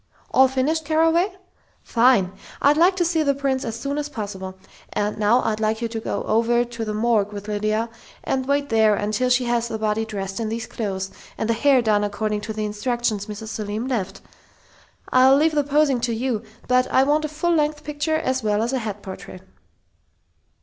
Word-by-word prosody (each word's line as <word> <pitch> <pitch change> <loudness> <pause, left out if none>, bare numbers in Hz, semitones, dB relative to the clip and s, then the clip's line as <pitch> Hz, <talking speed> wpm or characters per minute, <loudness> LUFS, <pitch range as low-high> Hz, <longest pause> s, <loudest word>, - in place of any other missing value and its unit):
All 265 0 +6
finished, 270 +5 0
Carraway?... 325 +5 +2 0.5
Fine! 230 -6 +3 0.3
I'd 285 +1 +4
like 350 +4 +4
to 355 -2 +1
see 330 -1 +1
the 280 -2 +2
prints 275 -1 -1
as 225 0 -4
soon 280 +3 -2
as 295 0 -3
possible, 195 -6 -6 0.3
and 210 0 -1
now 220 +4 +3
I'd 220 -1 -1
like 220 0 0
you 235 - -1
to 225 0 -4
go - - -3
over 235 +2 +2
to 235 -1 -6
the 215 -1 -3
morgue 215 -2 +1
with 205 0 -7
Lydia, 215 +2 0 0.4
and 260 -1 -1
wait 285 0 +1
there 220 -2 +4
until 215 +5 0
she 250 0 +3
has 235 -1 0
the 225 - -4
body 215 0 0
dressed 195 -2 -5
in 225 -1 -2
these 225 0 -3
clothes, 195 -3 -4 0.3
and 220 - -2
the 230 - +2
hair 260 +1 +3
done 210 -2 +2
according 210 0 -2
to 220 - -5
the 215 0 -2
instructions 210 0 -2
Mrs. 215 +1 -7
Selim 215 +2 -4
left.... 195 -7 -3 0.9
I'll 260 +1 +6
leave 315 +2 +3
the 295 -1 +2
posing 285 -2 +2
to 235 -1 0
you, 235 -2 -1 0.3
but 255 0 +2
I 260 - +5
want 300 +3 +2
a - - -3
full 320 +3 0
length 300 -1 0
picture 300 +1 -1
as 260 -4 -1
well 210 0 +1
as 240 +3 -2
a 260 - +1
head 210 -3 -5
portrait." 190 -1 -9
235 Hz, 200 wpm, -22 LUFS, 215-275 Hz, 0.9 s, All